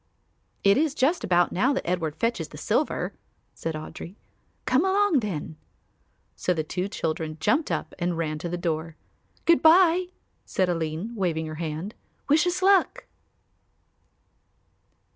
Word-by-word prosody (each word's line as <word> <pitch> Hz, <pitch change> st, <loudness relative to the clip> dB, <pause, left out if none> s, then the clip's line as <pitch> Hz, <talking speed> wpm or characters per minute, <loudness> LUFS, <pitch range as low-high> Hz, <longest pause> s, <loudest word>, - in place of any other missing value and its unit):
"It 200 Hz, 0 st, +5 dB
is 305 Hz, -2 st, +1 dB
just 315 Hz, +5 st, +1 dB
about 175 Hz, -1 st, +3 dB
now 250 Hz, +10 st, +2 dB
that 270 Hz, -, -3 dB
Edward 165 Hz, -4 st, -1 dB
fetches 230 Hz, +6 st, -1 dB
the -, -, -12 dB
silver," -, -, -1 dB, 0.4 s
said 165 Hz, -1 st, -4 dB
Audry. 155 Hz, +4 st, -8 dB, 0.5 s
"Come 260 Hz, +5 st, +3 dB
along 385 Hz, -4 st, +3 dB
then." 165 Hz, -8 st, -5 dB, 0.8 s
So 180 Hz, -, 0 dB
the 160 Hz, -, -1 dB
two 180 Hz, +4 st, -3 dB
children 160 Hz, -5 st, -3 dB
jumped 230 Hz, -, +1 dB
up -, -, -3 dB
and 175 Hz, -1 st, -1 dB
ran 155 Hz, -2 st, -2 dB
to 170 Hz, -, -4 dB
the 175 Hz, -, -3 dB
door. 165 Hz, -2 st, -3 dB, 0.5 s
"Good 335 Hz, -1 st, +5 dB
bye," 350 Hz, +2 st, +6 dB, 0.4 s
said 185 Hz, -1 st, 0 dB
Aline, 165 Hz, +5 st, -2 dB
waving 170 Hz, -7 st, -1 dB
her 155 Hz, -, -6 dB
hand, 165 Hz, +6 st, -4 dB, 0.3 s
"wish 305 Hz, +4 st, +4 dB
us 360 Hz, +1 st, -1 dB
luck." 390 Hz, -1 st, +3 dB
185 Hz, 145 wpm, -26 LUFS, -, 0.8 s, bye